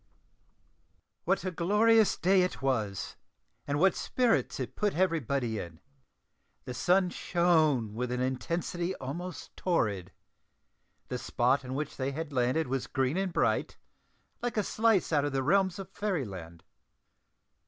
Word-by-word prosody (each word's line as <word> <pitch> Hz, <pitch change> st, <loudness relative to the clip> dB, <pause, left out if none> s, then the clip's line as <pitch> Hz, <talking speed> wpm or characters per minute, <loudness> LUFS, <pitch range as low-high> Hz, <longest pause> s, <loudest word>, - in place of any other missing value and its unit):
What 190 Hz, +1 st, +1 dB
a 185 Hz, -, -1 dB
glorious 210 Hz, +5 st, +3 dB
day 190 Hz, +2 st, +4 dB
it 180 Hz, -, -1 dB
was, 110 Hz, -8 st, -1 dB, 0.5 s
and 145 Hz, 0 st, 0 dB
what 190 Hz, +1 st, +5 dB
spirits 245 Hz, -3 st, +1 dB
it -, -, -4 dB
put 210 Hz, -4 st, 0 dB
everybody 140 Hz, -, 0 dB
in! 85 Hz, -2 st, -8 dB, 0.9 s
The 125 Hz, -, -5 dB
sun 180 Hz, +7 st, +2 dB
shone 155 Hz, -, +2 dB
with 125 Hz, +2 st, -3 dB
an 125 Hz, -, -1 dB
intensity 170 Hz, +8 st, -2 dB
almost 170 Hz, +7 st, -6 dB
torrid; 100 Hz, -, 0 dB, 1.0 s
the -, -, -3 dB
spot 130 Hz, +3 st, +1 dB
on 130 Hz, 0 st, -5 dB
which 150 Hz, +2 st, -4 dB
they 135 Hz, +1 st, -2 dB
had 155 Hz, 0 st, -5 dB
landed 130 Hz, +5 st, +1 dB
was 130 Hz, 0 st, -2 dB
green 130 Hz, +2 st, 0 dB
and 190 Hz, -1 st, -1 dB
bright, -, -, 0 dB, 0.6 s
like 240 Hz, -2 st, -2 dB
a 210 Hz, -, +3 dB
slice 220 Hz, -5 st, +2 dB
out 145 Hz, -2 st, +3 dB
of 145 Hz, -, -2 dB
the 135 Hz, -1 st, 0 dB
realms 190 Hz, +3 st, +2 dB
of 195 Hz, -2 st, -6 dB
Fairy 190 Hz, -10 st, -1 dB
land. 85 Hz, -5 st, -9 dB
155 Hz, 145 wpm, -30 LUFS, 125-185 Hz, 1.0 s, what